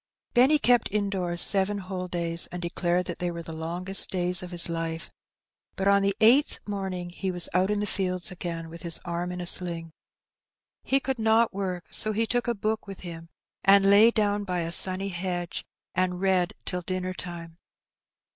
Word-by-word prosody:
Benny 265 +5 +5
kept 245 -6 +2
indoors 190 -4 0
seven 200 +1 +2
whole 185 -1 -5
days, 170 -1 +1
and 180 - -7
declared 175 +1 -1
that 175 - -6
they 180 - -1
were 170 -1 -6
the 165 - -8
longest 175 +4 0
days 180 0 +2
of 180 - -7
his 175 -1 0
life. 165 0 -4 0.6
But 195 - -1
on 200 0 +5
the 195 0 +1
eighth 250 +7 +4
morning 190 -3 -4
he 190 +2 -4
was 175 -2 +3
out 185 +2 +2
in 210 0 0
the - - -1
fields 185 -2 -2
again 170 -2 -5
with 170 - -9
his 170 -2 -1
arm 175 +1 -3
in 180 - -6
a 175 - -4
sling. 170 -2 -2 0.9
He 270 - +1
could 265 -2 -3
not 225 +1 +3
work, 185 -3 -5
so 215 - +5
he 225 +2 +1
took 245 +2 0
a 235 - 0
book 215 +1 -2
with 195 -1 -8
him 165 -2 -8 0.3
and 195 0 +6
lay 210 +3 +8
down 205 -2 0
by 180 -3 -2
a 165 0 -3
sunny 190 +2 +3
hedge, 175 -1 -3 0.3
and 180 0 0
read 185 -2 +1
till 180 - -3
dinner 185 +1 -3
time. 170 -2 -8
185 Hz, 190 wpm, -26 LUFS, 175-200 Hz, 0.9 s, lay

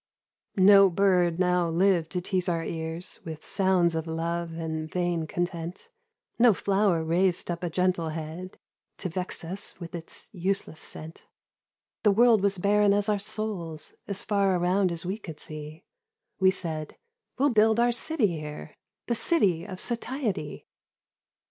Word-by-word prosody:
93 190 - +2
Kultur. 205 - +9
No 195 -1 +8
bird 180 -2 +2
now 180 -2 +2
lived 170 -1 +2
to 180 - -2
tease 185 0 -1
our 165 -1 -1
ears 160 +2 -3
With 160 -1 -8
sounds 185 -3 +3
of 160 0 -3
love 165 +1 -2
and 160 -1 -4
vain 175 -2 -1
content, 175 - -4 0.5
No 235 -4 +6
flower 195 -4 +1
raised 175 +2 +1
up 170 0 -4
a 175 - -2
gentle 180 -1 0
head 160 +4 -7 0.4
To 185 - -4
vex 180 +1 -2
us 185 +4 -4
with 170 -2 -8
its 165 -1 -6
useless 185 -4 -2
scent; 160 +1 -6 0.7
The 210 - +4
world 225 +1 +5
was 200 -1 +2
barren 205 +2 +3
as 205 +1 +1
our 205 -1 +1
souls 195 -7 -4
As 200 -1 -2
far 200 -2 +2
around 180 +1 +2
as 170 0 -5
we 195 +4 -3
could 160 -7 -9
see; 155 +1 -8 0.6
We 190 -1 +5
said, 160 -5 -2 0.2
' 470 - -56
We'll 280 +2 +3
build 220 0 +4
our 240 0 +4
city 245 +2 +1
here, 150 0 -8 0.3
The 240 - 0
City 200 - +2
of 185 -2 -8
Satiety.' 235 - -3
180 Hz, 160 wpm, -27 LUFS, 165-200 Hz, 0.7 s, Kultur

